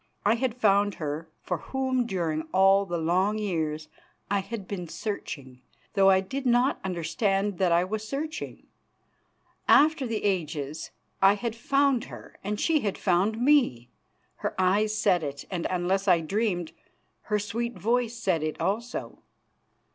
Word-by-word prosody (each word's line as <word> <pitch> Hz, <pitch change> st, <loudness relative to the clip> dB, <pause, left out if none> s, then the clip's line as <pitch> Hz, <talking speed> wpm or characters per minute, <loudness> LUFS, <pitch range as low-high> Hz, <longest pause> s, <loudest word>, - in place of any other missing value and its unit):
I 210 Hz, -, +5 dB
had 235 Hz, 0 st, -1 dB
found 205 Hz, -3 st, +3 dB
her 155 Hz, +1 st, -4 dB
for -, -, -2 dB
whom 260 Hz, -2 st, -1 dB
during 165 Hz, -6 st, -2 dB
all 195 Hz, +1 st, +5 dB
the 175 Hz, -1 st, -2 dB
long 185 Hz, +6 st, +1 dB
years 160 Hz, -7 st, -2 dB, 0.4 s
I 200 Hz, -, +3 dB
had 195 Hz, 0 st, -6 dB
been 180 Hz, -4 st, -5 dB
searching, 140 Hz, -, -6 dB, 0.3 s
though 195 Hz, -1 st, +5 dB
I 190 Hz, 0 st, +5 dB
did 265 Hz, +9 st, -5 dB
not 250 Hz, +2 st, +2 dB
understand 190 Hz, +2 st, -1 dB
that 185 Hz, -2 st, +3 dB
I 170 Hz, +1 st, +4 dB
was 215 Hz, +3 st, -4 dB
searching. 305 Hz, +5 st, -5 dB, 1.0 s
After 295 Hz, -2 st, +5 dB
the 225 Hz, -2 st, -3 dB
ages 155 Hz, -6 st, -2 dB, 0.3 s
I 195 Hz, +1 st, +6 dB
had 225 Hz, +1 st, -3 dB
found 275 Hz, +1 st, +2 dB
her -, -, -12 dB
and 210 Hz, +1 st, -3 dB
she 325 Hz, -2 st, +2 dB
had 205 Hz, -7 st, -2 dB
found 195 Hz, +4 st, +1 dB
me. 245 Hz, -, +3 dB, 0.5 s
Her -, -, -3 dB
eyes 210 Hz, +4 st, +2 dB
said 180 Hz, -5 st, +3 dB
it, 140 Hz, -2 st, -5 dB
and, 175 Hz, -3 st, -1 dB
unless 185 Hz, +2 st, 0 dB
I 180 Hz, -3 st, +5 dB
dreamed, 180 Hz, -1 st, -1 dB, 0.6 s
her 210 Hz, -, +2 dB
sweet 230 Hz, +3 st, -3 dB
voice 240 Hz, +1 st, 0 dB
said 185 Hz, -9 st, 0 dB
it 155 Hz, 0 st, -3 dB
also. 230 Hz, +5 st, -3 dB
195 Hz, 150 wpm, -27 LUFS, 175-230 Hz, 1.0 s, I